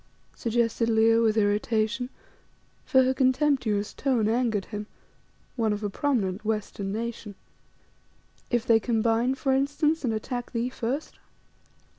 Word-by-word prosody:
suggested 230 0 0
Leo 225 0 +4
with 220 -1 +2
irritation, 215 +3 +1 0.8
for 260 -1 +4
her 260 +1 +2
contemptuous 260 -6 +1
tone 250 -6 +1
angered 225 -3 0
him, 210 -1 -6 0.7
one 225 -4 +1
of 210 +1 -3
a 205 - -2
prominent 210 -8 -1
western 210 -2 -3
nation. 225 -1 -5 1.1
"If 240 -1 0
they 230 -3 +5
combine, 230 +2 +1
for 270 0 0
instance, 290 +4 +1
and 245 - +1
attack 245 +3 -4
thee 235 +1 -1
first?" 255 +4 -4
230 Hz, 125 wpm, -26 LUFS, 215-255 Hz, 1.1 s, they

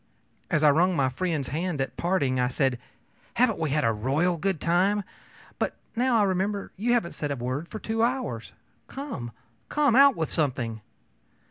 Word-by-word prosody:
As 155 - +1
I 150 - +7
wrung 175 +5 +3
my 135 -4 +2
friend's 155 -1 -2
hand 165 +1 -2
at 135 - -2
parting, 145 -8 0
I 125 - +2
said: 130 -1 0 0.6
ōHaven't 230 -6 +3
we 160 -2 0
had 150 +1 +1
a 115 - +3
royal 140 +11 +1
good 185 0 -1
time! 190 +5 +2 0.6
But - - -1 0.2
now 245 0 +2
I 215 - +4
remember, 195 +1 -1
you 235 +5 +1
haven't 205 -8 +1
said 145 - -4
a 140 - -1
word 130 +6 -3
for 220 - -7
two 225 +1 -2
hours. 230 - -1 0.4
Come, 265 - -6 0.4
come, 290 -5 +3
out 275 0 +7
with 160 -1 -2
something! 120 -7 -1
170 Hz, 175 wpm, -26 LUFS, 135-210 Hz, 0.6 s, I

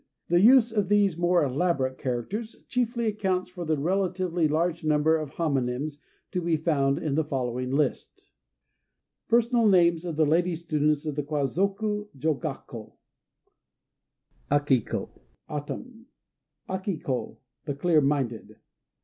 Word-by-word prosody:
The 175 +1 +4
use 240 +1 +6
of 205 -4 0
these 205 -4 +3
more 175 0 +2
elaborate 135 -2 0
characters 155 - -4
chiefly 240 -1 -1
accounts 190 -4 -1
for 180 -2 -6
the 155 -1 +1
relatively 180 0 0
large 165 +2 0
number 155 +1 +3
of 155 -3 -3
homonyms 140 -1 -1 0.3
to 180 - -1
be 170 -2 +1
found 140 -4 +1
in 155 -3 -2
the 160 +3 +2
following 125 -3 -3
list: 140 0 -2 1.0
PERSONAL 235 0 +3
NAMES 170 -3 +4
OF 165 -3 -4
LADY 165 +3 +2
STUDENTS 155 -2 0
OF 150 - -2
THE 150 - 0
KWAZOKU 195 - -1
JOGAKKÔ 135 -6 -4 1.6
Aki 145 -3 +3
ko - - -6 0.3
"Autumn." 225 - -7 0.6
Aki 190 -1 -3
ko 130 -4 -4 0.3
"The 145 - -3
Clear 155 +1 +3
Minded." 135 -5 -1
160 Hz, 125 wpm, -27 LUFS, 145-190 Hz, 1.6 s, use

